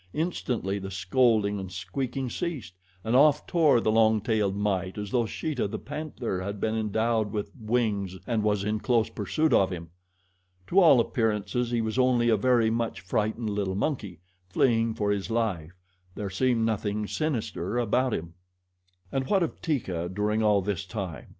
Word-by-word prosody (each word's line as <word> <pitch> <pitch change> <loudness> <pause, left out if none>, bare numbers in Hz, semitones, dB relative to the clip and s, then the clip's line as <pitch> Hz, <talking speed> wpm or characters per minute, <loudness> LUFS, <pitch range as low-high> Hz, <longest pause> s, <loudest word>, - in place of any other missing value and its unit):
Instantly 125 - -2
the 95 0 -6
scolding 100 +2 +2
and 95 -1 -6
squeaking 125 +9 -3
ceased, 130 - -4 0.3
and 110 +4 0
off 150 +2 +5
tore 155 -8 +4
the 110 - +1
long 110 0 +4
tailed 105 -2 0
mite 95 -2 -1
as 105 -1 -5
though 120 -3 +1
Sheeta, 140 -1 -2
the - - -4
panther, 145 -10 -4
had 100 +2 -5
been 110 +1 0
endowed 110 0 0
with 105 -1 -3
wings 105 -5 -1
and 115 -3 0
was 105 -1 +1
in 105 +1 -1
close 115 -1 +1
pursuit 155 - 0
of 95 - +4
him. 85 -3 -7 0.7
To 185 - +3
all 160 -9 +7
appearances 115 0 0
he 120 -1 0
was 110 +3 -2
only 125 -2 +3
a 110 - +5
very 115 0 +3
much 115 0 -2
frightened 110 +3 -1
little 100 -2 -1
monkey, 105 - -3 0.3
fleeing 115 +2 +2
for 105 -1 0
his 100 0 -2
life 95 -8 -2 0.4
there 100 -2 -4
seemed 115 +2 +1
nothing 105 -1 -1
sinister 120 - -2
about 125 +2 +1
him. 85 -4 -4 0.8
And 135 -1 -1
what 195 -3 +3
of 165 - -4
Teeka 95 - -2
during 105 +3 0
all 105 -2 +3
this 100 0 -2
time? 95 - -6
110 Hz, 170 wpm, -27 LUFS, 100-125 Hz, 0.8 s, all